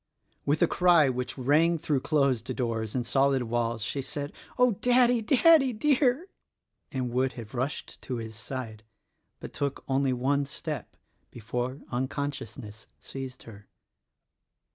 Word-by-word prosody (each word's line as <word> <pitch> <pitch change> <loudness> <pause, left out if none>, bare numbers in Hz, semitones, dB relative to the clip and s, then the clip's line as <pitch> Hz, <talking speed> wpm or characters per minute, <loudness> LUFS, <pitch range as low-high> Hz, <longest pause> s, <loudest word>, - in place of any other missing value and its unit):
With 145 +4 +3
a - - +5
cry 170 -6 +4
which 125 +1 -3
rang 155 +6 +3
through 150 -3 0
closed 140 -5 +1
doors 115 -3 -2
and 125 -2 -1
solid 135 +1 +2
walls 115 -1 -1
she 135 +4 -2
said, 145 +2 -5 0.2
"Oh, 250 -1 +5
Daddy, 245 -1 +4
Daddy, 270 +3 +5
dear!" 280 - +2 0.6
and 130 -3 -2
would 130 +2 +1
have 115 -4 -9
rushed 130 +3 -4
to 130 - -4
his 110 -2 -6
side; 110 -1 -6 0.6
but - - -9
took 140 -1 -3
only 135 0 +1
one 140 +3 +1
step 140 - -6 0.3
before 125 +3 -4
uncon 135 +3 -1
sciousness 110 -4 -10
seized 130 -1 -8
her. 105 -2 -13
135 Hz, 140 wpm, -28 LUFS, 120-155 Hz, 0.6 s, a